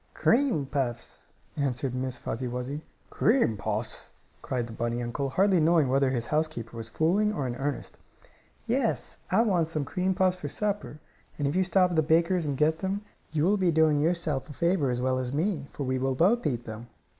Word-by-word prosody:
"Cream 235 - +2
puffs," 130 -4 -3 0.3
answered 135 -2 -1
Miss 130 0 -2
Fuzzy 125 +2 -4
Wuzzy. 125 +4 -4 0.3
"Cream 220 - +3
puffs?" 110 +2 -3 0.3
cried 125 -2 -2
the 115 - -9
bunny 120 +1 -2
uncle, 135 +4 -2
hardly 190 +5 +3
knowing 160 -3 +4
whether 135 0 +3
his 120 -3 -1
housekeeper 150 -7 -2
was 115 -1 -6
fooling 185 - +2
or 145 -10 -2
in 120 -1 -3
earnest. 145 +2 -4 0.7
"Yes, 240 0 -1
I 225 - +4
want 180 -8 +2
some 155 -3 -2
cream 185 +5 -1
puffs 185 0 +2
for 150 - -5
supper, 205 -4 -3 0.4
and 145 - 0
if 145 - -1
you 190 - +3
stop 185 0 +3
at - - -1
the - - +6
baker's 165 +2 +2
and 140 -2 -2
get 155 +2 +2
them 195 +3 -2 0.3
you 150 -1 0
will 200 +5 +3
be 185 -3 +2
doing 160 -2 +4
yourself 160 -3 0
a - - -7
favor 170 -3 +1
as 125 0 -1
well 130 0 +1
as 125 -1 -3
me, 155 -1 -1
for 145 - -5
we 130 0 -1
will 135 0 0
both 190 - +3
eat 120 -4 -2
them." 110 +2 -8
150 Hz, 200 wpm, -28 LUFS, 130-180 Hz, 0.7 s, the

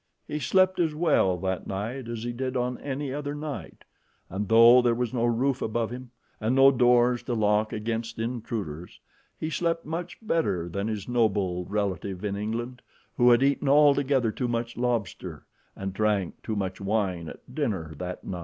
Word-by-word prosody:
He 150 - -3
slept 185 +6 +3
as 160 -3 +1
well 150 - +2
that 95 -1 -2
night 115 +6 -4
as 115 -1 -5
he 120 0 -3
did 130 +1 -3
on 125 0 -2
any 140 -1 -4
other 145 0 -4
night, 150 -1 -7 0.5
and 95 +2 -3
though 115 +2 +8
there 120 -1 +2
was 120 -1 -2
no 120 -2 +1
roof 125 +3 +1
above 115 +1 -1
him, 125 0 -7 0.3
and 115 +4 0
no 135 +1 +7
doors 125 -1 +4
to 120 - -3
lock 105 0 +2
against 115 +1 -3
intruders, 110 -8 -5 0.4
he 155 - -3
slept 165 0 -1
much 170 +3 -5
better 165 - 0
than 100 +4 -3
his 105 -3 -4
noble 100 -7 +1
relative 100 -1 -3
in 100 -1 -1
England, 115 +4 -4 0.3
who 120 0 +5
had 120 +2 +5
eaten 140 0 +2
altogether 140 -4 +4
too 125 +3 -2
much 115 0 -2
lobster 120 -6 -3 0.3
and 95 -1 -5
drank 105 -3 0
too 110 - -3
much 95 -1 -3
wine 95 -5 -1
at 125 - -13
dinner 100 - -2
that 90 0 -5
night. 90 - -5
120 Hz, 175 wpm, -27 LUFS, 100-130 Hz, 0.5 s, though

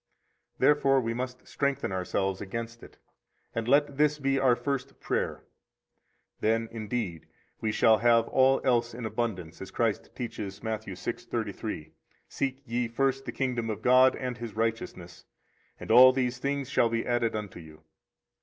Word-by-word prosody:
Therefore 140 -2 +4
we 115 -2 -2
must 125 +1 -5
strengthen 140 -5 -1
ourselves 95 +1 -1
against 115 +3 -5
it, - - -14 0.6
and 115 0 -3
let 140 +1 +3
this 150 0 +3
be 135 -1 +1
our 130 -2 +4
first 135 0 -4
prayer; - - -2 1.0
then, 115 +1 +1
indeed, 110 -6 -4 0.3
we 110 - -1
shall 110 0 +4
have 115 0 +4
all 135 0 +4
else 120 -2 +1
in 120 -1 -6
abundance, 105 -7 -3
as - - -7
Christ - - -1
teaches 105 -5 -5
[ - - -25
Matt. 110 -1 -3
6:33 90 -4 -5 0.2
]: - - -39
Seek 135 0 -3
ye 120 -1 -1
first 135 +3 0
the - - -4
kingdom 125 -4 -2
of 110 0 -4
God 130 +1 +6
and 125 -2 -4
His 115 -3 -6
righteousness, 110 -6 -3 0.5
and - - -5
all 130 +1 +9
these 130 -1 -1
things 140 0 -2
shall 115 - +2
be 115 0 -1
added 120 -2 0
unto 105 -4 -5
you. 80 -1 -14
120 Hz, 160 wpm, -28 LUFS, 110-130 Hz, 1.0 s, all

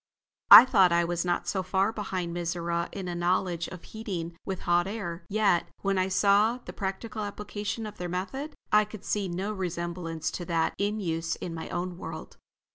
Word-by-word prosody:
I - - +13
thought 190 -8 +5
I 170 0 +3
was 175 0 -1
not 175 -1 -1
so 190 - 0
far 190 +3 +1
behind 185 -5 -3
Mizora 170 0 -2
in 195 -2 -5
a 175 - -3
knowledge 175 0 0
of 180 - -10
heating 180 -7 -5
with 190 -2 -4
hot 175 +1 +2
air; 195 -5 -5
yet, 205 -4 +2 0.2
when 195 -1 +1
I 185 - +2
saw 205 +4 +3
the 250 - -10
practical 215 +3 -4
application 210 +2 -4
of 210 - -9
their 180 0 -3
method, 265 - -4 0.2
I 210 0 +6
could 210 -1 -10
see 205 -2 -1
no 190 +4 -3
resemblance 170 -3 -3
to 175 - -5
that 165 -2 0
in 205 +2 0
use 165 -3 -2
in 170 - -6
my 160 -1 -6
own 175 0 -4
world. 160 -2 -8
185 Hz, 190 wpm, -28 LUFS, 170-205 Hz, 0.2 s, I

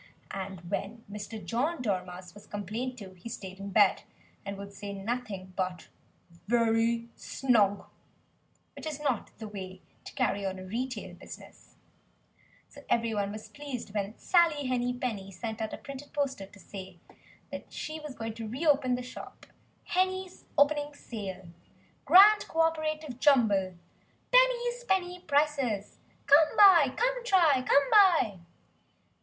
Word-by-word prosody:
And 190 -2 -6
when 225 +4 -4
Mr. 210 +1 -7
John 285 +9 -1
Dormouse 180 -5 -4
was 205 - -15
complained 220 +6 -4
to, 200 -5 -9
he 185 +5 -10
stayed 190 -3 -8
in 200 0 -6
bed, 195 - +4 0.4
and 200 0 -6
would 200 0 -9
say 200 0 -7
nothing 200 -3 -5
but 185 -2 -3 0.6
"very 230 0 +2
snug;" 210 -7 +1 0.9
which - - -7
is 300 -2 -4
not 275 -7 -1
the 220 - -7
way 190 -3 -8 0.3
to - - -9
carry 200 - 0
on 190 -1 -3
a 185 - -8
retail 220 -2 -4
business. 175 - -13 0.9
So 285 - -15
everybody 220 -4 +1
was 215 +1 -8
pleased 270 -8 -7
when 205 +1 -3
Sally 330 -5 +3
Henny 250 -1 0
Penny 230 -6 -4
sent 220 +4 -6
out 220 - -2
a - - -5
printed 275 0 -10
poster 270 -9 -2
to 205 +1 -17
say 190 -2 -10 0.5
that - - -8
she 310 +1 -5
was 300 -3 -8
going 225 -1 -5
to 225 0 -6
re 260 +9 -4
open 280 -4 +3
the 250 - -5
shop 250 - -10 0.4
"Henny's 375 0 -1
Opening 290 0 +3
Sale! 190 -9 -7 0.6
Grand 415 +3 +7
co 325 - +1
operative 310 -4 -1
Jumble! 210 -10 +3 0.6
Penny's - - +3
penny 365 -4 0
prices! 280 -8 0 0.3
Come 300 +2 +5
buy, 350 -10 +8
come - - 0
try, 335 - +4
come 280 - +3
buy!" 350 - +5
235 Hz, 145 wpm, -29 LUFS, 200-300 Hz, 0.9 s, buy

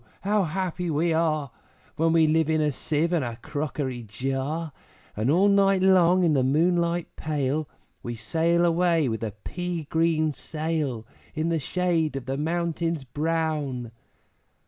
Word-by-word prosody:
How 205 0 +1
happy 180 +1 -2
we 160 +2 +1
are, 155 -4 0 0.4
When 165 +1 +2
we 165 -1 +5
live 160 0 +2
in 160 0 +2
a 150 -1 +2
Sieve 155 +5 -1
and 165 -5 +2
a 120 -2 -4
crockery 145 -2 -4
jar, 135 +8 -3 0.4
And 110 +5 0
all 180 +7 +4
night 195 -1 +4
long 185 -1 +5
in 165 -3 +3
the 135 - +3
moonlight 170 +5 +1
pale, 150 -1 -2 0.3
We 120 0 -5
sail 165 +9 +1
away 170 -3 +2
with 110 -2 -2
a 110 -3 -4
pea 175 -2 -4
green 160 -2 +2
sail, 150 -6 -3 0.3
In 160 +1 0
the 165 -1 +1
shade 165 0 0
of 135 -3 -5
the 135 0 -2
mountains 165 0 -1
brown!' 145 -3 -2
160 Hz, 150 wpm, -26 LUFS, 140-170 Hz, 0.4 s, we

